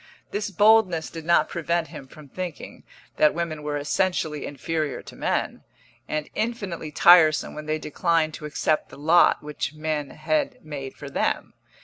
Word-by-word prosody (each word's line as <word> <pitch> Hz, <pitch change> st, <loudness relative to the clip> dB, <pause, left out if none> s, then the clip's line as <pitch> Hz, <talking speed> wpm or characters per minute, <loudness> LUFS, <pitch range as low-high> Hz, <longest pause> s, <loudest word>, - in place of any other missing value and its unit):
This 205 Hz, 0 st, -2 dB
boldness 200 Hz, -4 st, +4 dB
did 165 Hz, -2 st, -8 dB
not 170 Hz, +1 st, +4 dB
prevent 170 Hz, -1 st, -1 dB
him 150 Hz, -4 st, -10 dB
from 150 Hz, +2 st, -14 dB
thinking 180 Hz, +2 st, -7 dB, 0.4 s
that 150 Hz, -, +4 dB
women 165 Hz, -3 st, -3 dB
were 150 Hz, 0 st, -2 dB
essentially 155 Hz, 0 st, -1 dB
inferior 150 Hz, +1 st, -3 dB
to -, -, -12 dB
men, -, -, -2 dB, 0.5 s
and 155 Hz, -1 st, -2 dB
infinitely 200 Hz, -8 st, -3 dB
tiresome 160 Hz, -1 st, +6 dB
when 150 Hz, 0 st, -8 dB
they 155 Hz, 0 st, 0 dB
declined 155 Hz, +1 st, 0 dB
to 150 Hz, -, -8 dB
accept 150 Hz, +1 st, 0 dB
the -, -, -12 dB
lot 160 Hz, +4 st, +4 dB
which 150 Hz, 0 st, -4 dB
men 155 Hz, -2 st, -2 dB
had 280 Hz, -5 st, -2 dB
made 140 Hz, -3 st, -7 dB
for -, -, -9 dB
them. -, -, -1 dB
155 Hz, 155 wpm, -24 LUFS, 150-175 Hz, 0.5 s, tiresome